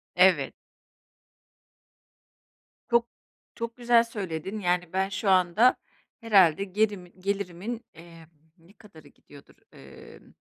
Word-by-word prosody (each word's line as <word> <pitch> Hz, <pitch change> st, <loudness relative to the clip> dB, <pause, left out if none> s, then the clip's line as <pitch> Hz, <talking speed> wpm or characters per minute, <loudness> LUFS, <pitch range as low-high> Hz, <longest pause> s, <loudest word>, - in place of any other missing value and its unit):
Evet. 180 Hz, -6 st, +4 dB, 2.4 s
Çok 235 Hz, 0 st, +2 dB, 0.5 s
çok 230 Hz, +1 st, -6 dB
güzel 240 Hz, -1 st, +4 dB
söyledin. 195 Hz, -3 st, -6 dB
Yani, 180 Hz, -2 st, -1 dB
ben, 190 Hz, +1 st, 0 dB
şu 200 Hz, +1 st, -2 dB
anda 185 Hz, +6 st, +4 dB, 0.5 s
herhâlde 195 Hz, -6 st, +4 dB
gerimi 200 Hz, -2 st, -2 dB
gelirimin, 200 Hz, +4 st, -4 dB
emm, 165 Hz, 0 st, -15 dB, 0.3 s
ne 170 Hz, +4 st, -22 dB
kadarı 205 Hz, -8 st, -17 dB
gidiyordur? 145 Hz, -1 st, -18 dB, 0.2 s
Emm. -, -, -15 dB
190 Hz, 95 wpm, -26 LUFS, 175-220 Hz, 2.4 s, Evet